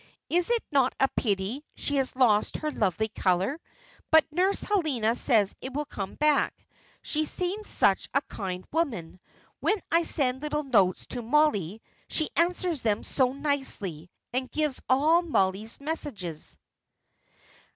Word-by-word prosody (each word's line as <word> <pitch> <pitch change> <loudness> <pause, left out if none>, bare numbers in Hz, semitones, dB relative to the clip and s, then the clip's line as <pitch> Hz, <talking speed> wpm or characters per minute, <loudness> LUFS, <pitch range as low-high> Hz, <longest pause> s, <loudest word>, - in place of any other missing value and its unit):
Is 350 +3 +3
it 475 -1 +1
not 270 -3 +2
a 270 - +5
pity 210 +5 -1
she 285 - -2
has 265 -2 0
lost 220 -5 +3
her 305 0 -3
lovely 220 - 0
colour? 190 - 0 0.5
But 320 -1 +6
Nurse 370 +5 +1
Helena 280 - +1
says 220 -6 +3
it 260 - -6
will 295 +1 -1
come 195 -8 -6
back. 300 -1 +2 0.5
She 310 0 0
seems 370 +6 -2
such - - +2
a - - +1
kind 185 -2 -6
woman. 225 - -2 0.4
When 420 0 +1
I 335 +1 +5
send 265 -5 +1
little 300 0 -2
notes 200 -9 +2
to 245 - -4
Mollie, 225 - +1 0.2
she 315 - -1
answers 345 -3 +1
them 215 -2 0
so 255 -2 +1
nicely, 265 - -2 0.2
and 255 0 -1
gives 300 -3 -1
all 305 +6 +4
Mollie's 215 - 0
messages." 260 - -5
270 Hz, 140 wpm, -27 LUFS, 210-310 Hz, 0.5 s, But